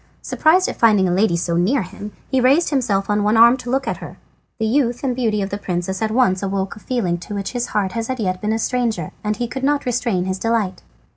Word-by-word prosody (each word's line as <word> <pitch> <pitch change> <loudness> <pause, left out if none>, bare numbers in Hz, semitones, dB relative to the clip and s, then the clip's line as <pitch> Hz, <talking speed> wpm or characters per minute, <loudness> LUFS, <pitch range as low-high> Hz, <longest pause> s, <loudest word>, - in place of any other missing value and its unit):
Surprised 350 +4 +3
at - - -4
finding 210 -5 +4
a 175 - +1
lady 190 -1 +2
so 170 0 -1
near 215 +9 +2
him, 205 +3 -9 0.2
he 265 -1 +2
raised 280 +8 +3
himself 220 -8 0
on 210 0 +1
one 210 +2 +2
arm 235 +2 +7
to 245 -2 -8
look 270 +2 0
at - - -1
her. - - -10 0.4
The 220 - -1
youth 245 +1 +1
and 255 -3 0
beauty 220 -5 0
of 195 - -5
the 200 - -3
princess 190 0 -3
at 220 - +1
once 215 -5 +2
awoke 195 0 -2
a - - -12
feeling 200 -9 -1
to 205 +4 -7
which 200 -1 -3
his 245 -1 -2
heart 200 -3 -1
had 230 0 -4
as 255 -1 -3
yet 185 -3 -2
been 210 - -1
a 220 - +1
stranger, 225 -8 -1
and 210 0 -1
he 240 0 -2
could 265 +3 -6
not 285 +1 +1
restrain 235 -7 0
his 190 0 -3
delight. 215 -5 -1
220 Hz, 255 wpm, -20 LUFS, 190-245 Hz, 0.4 s, arm